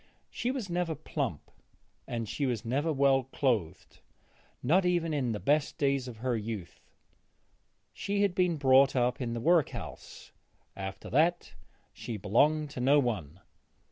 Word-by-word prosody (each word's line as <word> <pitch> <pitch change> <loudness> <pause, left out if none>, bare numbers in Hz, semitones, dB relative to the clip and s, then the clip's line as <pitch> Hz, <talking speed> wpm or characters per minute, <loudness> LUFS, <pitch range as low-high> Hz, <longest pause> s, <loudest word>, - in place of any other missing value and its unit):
She 240 - -2
was 255 -6 -3
never 175 -2 -1
plump; 140 - -4 0.7
she 140 +6 -2
was 120 -5 -2
never 140 +7 0
well 135 -2 +3
clothed, 115 - -2 0.6
not 170 +10 +3
even 175 -3 +1
in 130 -5 0
the 105 - -3
best 145 +4 +1
days 140 -2 0
of 120 -3 -8
her 125 +1 -1
youth. 105 -5 -6 1.1
She 200 0 -1
had 200 -3 +2
been 180 -3 +1
brought 135 -1 +5
up 125 +1 +1
in 120 -2 -2
the - - -3
work 165 +4 +3
house; - - -9 0.4
after 95 0 -6
that 170 +6 +2 0.4
she 115 - -6
belonged 145 +9 +2
to 130 - -7
no 135 +4 +4
one. 100 - -2
135 Hz, 145 wpm, -30 LUFS, 115-155 Hz, 1.1 s, brought